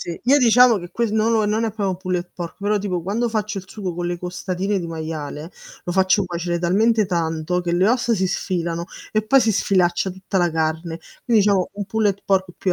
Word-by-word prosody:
Sì, 170 - -6
io 265 +4 +5
diciamo 245 -2 +6
che 175 -2 -7
que 235 +5 0
no, 220 +1 +2
no, 220 -2 +2
non 220 +2 0
è 225 - -2
pro 195 -4 -2
pulled 180 -1 -3
pork, 170 -2 -6
però 205 +1 0
tipo 195 -3 -2
quando 225 +6 -1
faccio 215 -2 -2
il 190 - -5
sugo 190 -3 -5
con 175 +1 -4
le 175 0 -3
costatine 185 +2 -2
di 170 - -4
maiale, 160 -1 -6 0.3
lo 175 - -3
faccio 190 +1 +3
cuocere 175 0 -2
talmente 210 +5 +2
tanto 170 0 -1
che 170 - -2
le 185 +3 +3
ossa 240 0 +1
si 190 -3 +1
sfilano 170 -2 -2 0.3
e 215 - +1
poi 265 +5 +5
si 225 -2 +2
sfilaccia 185 -2 +1
tutta 190 +1 -5
la 175 -2 +3
carne. 160 +1 -2 0.2
Quindi 230 -4 +4
diciamo 195 -3 +2
un 200 0 -5
pulled 205 -1 0
pork 190 -2 +1
più 185 - 0
190 Hz, 215 wpm, -21 LUFS, 175-215 Hz, 0.3 s, diciamo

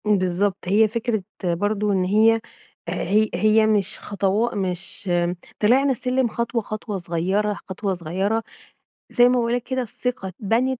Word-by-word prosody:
امم، 210 -1 +4
بالضبط 185 +1 -1
هي 215 +4 +4
فكرة 225 -2 -2 0.2
برضه 205 +4 0
إن 190 -2 +2
هي 220 +4 +4 0.5
آآ - - -2
هي 215 +1 +2
هي 215 0 +4
مش 205 -3 +1
خطوا 205 +3 0
مش 185 0 -3 0.5
طلعنا 260 +6 +4
السلم 255 0 0
خطوة، 235 +1 -2
خطوة 215 -1 -5
صغيّرة، 190 +4 0
خطوة 195 +1 -3
صغيّرة 190 +6 -1 0.7
زي 245 - +5
ما - - +2
باقُول 235 -1 +1
لَك 245 -1 -1
كده 260 +1 -2
الثقة 245 -2 -4
اتبنت 230 +7 -1
210 Hz, 150 wpm, -23 LUFS, 190-230 Hz, 0.7 s, زي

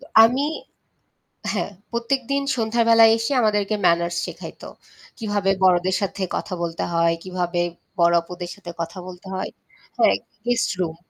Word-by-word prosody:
তো - - -13 0.2
আমি 250 +5 +2 1.1
হ্যাঁ, 200 0 -2 0.2
প্রত্যেকদিন 260 +3 0
সন্ধ্যার 230 0 +1
বেলায় 225 -1 +8
এসে 230 +5 -2
আমাদেরকে 210 -1 +1
ম্যানার্স 170 0 +2
শেখাইত। - - -9 0.5
কীভাবে 205 -4 0
বড়দের 185 0 +4
সাথে 200 0 -3
কথা 190 - -4
বলতে 165 -1 -3
হয়, 170 0 +3
কিভাবে 180 -1 -1 0.4
বড় 170 0 +5
অপুদের 175 +1 -7
সাথে 190 -4 -9
কথা 165 +3 -5
বলতে 180 +1 -10
হয়। 190 - -3 0.5
হ্যাঁ, - - +5 0.3
গেস্ট 245 -1 +1
রুম। 165 -3 -1
190 Hz, 140 wpm, -23 LUFS, 175-225 Hz, 1.1 s, বেলায়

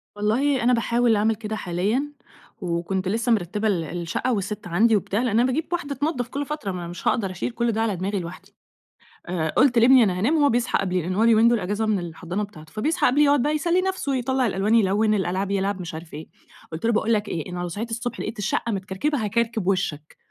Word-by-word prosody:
والله 245 +7 +1
أنا 250 +1 +4
باحاول 235 0 +2
أعمل 215 +2 +2
كده 220 0 -5
حاليًا، 210 +10 -1 0.5
وكنت 180 +2 -2
لسّه 225 +4 0
مِرتِّبة 210 +1 0
ال 185 -6 +1
الشقة 170 - -2
والست 205 -1 -3
عندي 215 +7 +3
وبتاع، 200 +1 -1
لأن 230 -2 +2
أنا - - +4
باجيب 290 +5 -1
واحدة 300 -5 -2
تنضّف 280 -3 -1
كل 280 +3 -4
فترة، 290 -10 -4
ما 180 - -5
أنا 170 - -6
مش 175 +1 -6
هاقدر 200 -6 +1
أشيل 185 +6 -3
كل 235 0 0
ده 225 - -1
على 220 -3 0
دماغي 195 +3 -2
لوحدي، 175 0 -9 0.7
آآ، 170 -3 -1
قلت 250 - +3
لابني 250 +1 +7
أنا 185 -3 0
هانام 245 - +2
هو 290 -2 +4
بيصحى 240 -1 +1
قبلي 185 -2 -1
لأن 180 +3 -3
هو 210 - +1
اليومين 230 0 +5
دول 235 -2 +2
أجازة 205 +4 -1
من 215 -2 +1
الحضانة 175 +3 -4
بتاعته، 155 -7 -10
فبيصحى 310 +11 +1
قبلي 290 +4 +4
يقعد 285 -2 +4
بقى 300 +3 +1
يسلّي 340 +4 +2
نفسه 375 -7 -1
يطلَّع 260 +1 0
الألوان 205 +1 +1
يلوِّن، 215 0 +3
الألعاب 190 0 -1
يلعب 195 -1 -1
مش 170 -2 -6
عارف 160 0 -9
إيه، 155 +2 -8 0.4
قلت 160 +5 -6
له 235 - +3
باقول 220 +1 +1
لك 210 -1 0
إيه 160 -1 -4
أنا 180 - -4
لو 175 - -3
صحيت 215 +7 -5
الصبح 235 +1 -4
لقيت 220 +1 -5
الشقة 215 +3 -1
متكركبة 210 +7 -2
هاكركب 225 -2 -1
وشَّك، 160 -6 -2
215 Hz, 220 wpm, -24 LUFS, 185-240 Hz, 0.7 s, لابني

